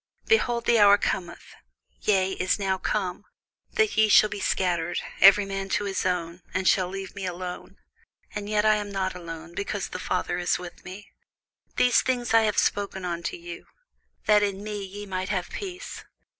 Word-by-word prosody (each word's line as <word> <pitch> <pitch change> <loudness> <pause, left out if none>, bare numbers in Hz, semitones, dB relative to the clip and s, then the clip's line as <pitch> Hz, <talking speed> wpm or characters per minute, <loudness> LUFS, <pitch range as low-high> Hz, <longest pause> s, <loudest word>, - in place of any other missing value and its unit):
Behold, 240 - +2
the 235 -1 +4
hour 205 -1 +7
cometh, 175 -3 -4 0.5
yea, 190 -2 +2
is 185 -1 0
now 190 -2 -1
come, 190 -2 -2 0.5
that 435 -1 +2
ye 220 0 +5
shall 210 +1 +6
be 210 -1 -5
scattered, 175 -3 0 0.2
every 200 +1 +7
man 195 0 -4
to 205 - 0
his 195 -2 -1
own, 175 -1 -2
and 185 0 0
shall 185 -2 +4
leave 195 0 -6
me 200 - -7
alone: 180 0 -6 0.6
and 210 0 -5
yet 210 0 +1
I 215 0 +5
am 205 -1 -5
not 190 -1 -1
alone, 165 -2 -8
because 200 +1 -3
the 185 - -6
Father 180 -1 -2
is 175 - +1
with 175 -1 -10
me. 190 +3 -10 0.6
These 250 -1 +4
things 245 -2 -1
I 225 - +7
have 210 - 0
spoken 200 -2 0
unto 170 -1 -3
you, 170 0 -9 0.6
that 210 -1 +5
in 200 -1 -1
me 210 -1 -4
ye 200 +2 -8
might 185 -1 -4
have 185 -3 -2
peace. 370 -3 -7
195 Hz, 180 wpm, -26 LUFS, 180-210 Hz, 0.6 s, hour